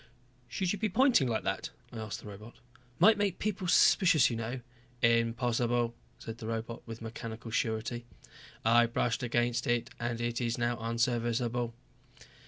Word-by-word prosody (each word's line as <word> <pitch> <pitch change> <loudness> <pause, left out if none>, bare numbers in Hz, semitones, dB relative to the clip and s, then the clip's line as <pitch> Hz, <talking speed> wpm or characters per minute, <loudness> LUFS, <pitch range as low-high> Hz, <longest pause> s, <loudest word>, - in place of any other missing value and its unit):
"Should 185 +7 -1
you 205 - -4
be 215 - 0
pointing 250 - +4
like 115 -2 -1
that?" - - -2 0.2
I - - -7
asked 110 -4 -5
the - - -11
robot. 105 +3 -10 0.4
"Might 215 -1 +6
make 200 -3 0
people 200 -3 -2
suspicious, 165 -6 +5
you - - -2
know." 115 +3 -4 0.4
"Impossible," 115 0 +2 0.3
the 115 0 -6
robot 115 +1 -4
said - - -31
with 115 0 -7
mechanical 115 0 -7
surety. 115 +1 -1 0.6
"I 120 +1 +5
brushed 120 +1 0
against 120 0 0
it 120 +1 0
and 120 0 -2
it 120 +1 -2
is 115 -1 -1
now 120 0 0
unserviceable." 115 +1 0
120 Hz, 155 wpm, -31 LUFS, 115-125 Hz, 0.6 s, Might